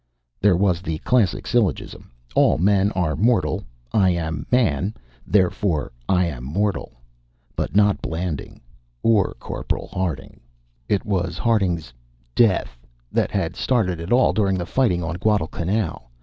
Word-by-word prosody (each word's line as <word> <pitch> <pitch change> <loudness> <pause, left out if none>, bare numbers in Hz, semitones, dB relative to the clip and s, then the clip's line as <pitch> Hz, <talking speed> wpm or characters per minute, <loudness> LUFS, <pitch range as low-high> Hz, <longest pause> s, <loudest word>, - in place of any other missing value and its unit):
There 100 -3 +4
was 90 -3 +2
the 80 -4 -3
classic 115 +2 +1
syllogism: 120 -6 -1 0.2
All - - +4
men 100 +3 +3
are 90 -4 0
mortal; 115 +3 +1 0.3
I 95 -3 +4
am 80 -3 -2
a - - +5
man; 100 - +1 0.3
therefore, 90 -4 +1 0.2
I 90 -1 +3
am 70 -8 -5
mortal. 100 +9 -2 0.6
But - - -3
not 105 -2 +4
Blanding 80 -2 -4 0.4
or 110 -4 +3
Corporal - - -4
Harding. 85 -8 -3 0.5
It 100 - +1
was 100 -4 -1
Harding's 90 - 0 0.4
"death" 95 - +2 0.3
that - - +1
had - - -2
started 100 -9 0
it 85 +2 -6
all 125 +2 +4
during 100 -3 +1
the 85 - -3
fighting 95 -7 +1
on 85 +1 -3
Guadalcanal. 95 - -1
95 Hz, 135 wpm, -22 LUFS, 85-105 Hz, 0.6 s, a